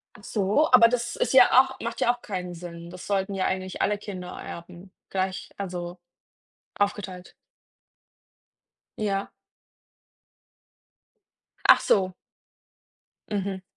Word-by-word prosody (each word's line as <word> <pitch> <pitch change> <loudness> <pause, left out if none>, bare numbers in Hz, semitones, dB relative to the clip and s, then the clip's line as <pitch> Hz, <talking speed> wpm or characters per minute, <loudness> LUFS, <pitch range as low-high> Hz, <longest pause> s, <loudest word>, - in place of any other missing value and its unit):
Ach 205 - -15
so, 210 +11 +1
aber 240 -2 +9
das 240 0 -2
ist - - 0
ja 260 -2 +8
auch 265 0 -1
macht 235 - -4
ja 240 - +4
auch 245 - -16
keinen 180 -5 -5
Sinn. 170 0 -9
Das 180 0 -10
sollten 195 0 0
ja 190 -1 0
eigentlich 185 -1 -3
alle 210 - +2
Kinder 190 -3 -7
Erben 175 +2 -9 0.2
gleich 190 0 -2
also 180 -2 -5 0.8
aufgeteilt. 195 -3 -2 1.7
Ja. 200 -2 -1 2.3
Ach - - +8
so. 185 -2 +2 1.2
Mhm. 195 -2 -2
195 Hz, 115 wpm, -26 LUFS, 180-210 Hz, 2.3 s, aber